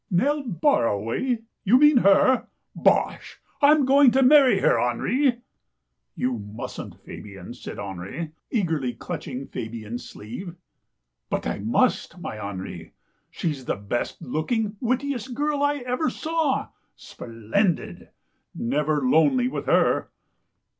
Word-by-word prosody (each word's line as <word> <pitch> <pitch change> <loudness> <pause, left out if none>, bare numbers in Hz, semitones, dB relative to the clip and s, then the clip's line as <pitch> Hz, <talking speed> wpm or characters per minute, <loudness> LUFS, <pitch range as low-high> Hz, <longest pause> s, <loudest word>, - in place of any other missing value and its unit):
"Nell 285 +12 +1
Barraway 225 - 0
— - - -55
you 225 +4 +5
mean 295 0 +6
her? 240 +4 +4 0.3
Bosh! - - +1 0.2
Fm 290 0 +5
going 275 0 +6
to 265 +2 +3
marry 260 -5 +6
her, - - +3
Henri." 240 - +1 0.3
" 60 0 -54
You 125 -2 -1
mustn't, 105 +1 -8
Fabian," 100 +1 -9
said 120 - -9
Henri, 100 - -6 0.2
eagerly 160 - -1
clutch 115 - -6
ing 130 +2 -5
Fabian's 115 +1 -6
sleeve. 165 - -8 0.4
" 60 0 -56
But - - -2
I - - -2
must, - - +1
my 110 - -6
Henri. 95 -4 -7 0.4
She's 145 -6 -4
the - - -1
best 100 +4 -4
looking, 205 - -1
wittiest 255 -1 -2
girl 295 +1 0
I 285 -2 +1
ever 250 +5 0
saw 320 -4 -1
— - - -44
splendid. 120 - -2 0.5
Never 145 +4 0
lonely 160 - +4
with 255 - -4
her." - - +2
170 Hz, 130 wpm, -24 LUFS, -, 0.5 s, mean